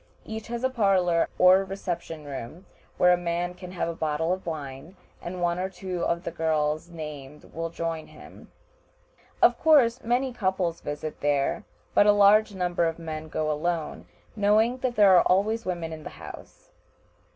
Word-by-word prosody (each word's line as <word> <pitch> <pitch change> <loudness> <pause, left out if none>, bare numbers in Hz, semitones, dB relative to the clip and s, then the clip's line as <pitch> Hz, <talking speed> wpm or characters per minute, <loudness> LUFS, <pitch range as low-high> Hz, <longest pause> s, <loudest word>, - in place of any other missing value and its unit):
Each 220 0 -6
has 235 +1 -5
a 260 - +2
parlor 190 -7 +2
or 185 +1 +6
reception 175 -5 -5
room, 140 +6 -8 0.3
where 180 0 +5
a - - +2
man 175 0 -2
can 180 0 -10
have 175 - -2
a 170 - -3
bottle 160 +1 -1
of 185 -1 -7
wine, 150 +2 -7 0.2
and 175 0 -5
one 175 0 0
or 190 +1 -2
two 185 -1 -5
of 170 +1 -1
the - - -4
girls 160 0 -1
named 150 -3 -9
will 165 0 -3
join 165 -1 -4
him. - - -15 0.9
Of - - +5
course 265 -7 +4
many 250 +2 0
couples 190 -6 -1
visit 150 +1 -5
there, 145 +8 0 0.3
but 205 - +5
a 205 - +7
large 205 +1 +5
number 175 -2 0
of 165 - -3
men 160 -1 -6
go 155 0 -1
alone, 160 +1 -3 0.3
knowing 220 +4 +2
that 250 -1 -2
there 200 -3 +6
are 175 - +7
always 215 +4 +1
women 170 -3 -3
in 155 - -8
the - - -7
house. - - -12
175 Hz, 175 wpm, -26 LUFS, 160-200 Hz, 0.9 s, a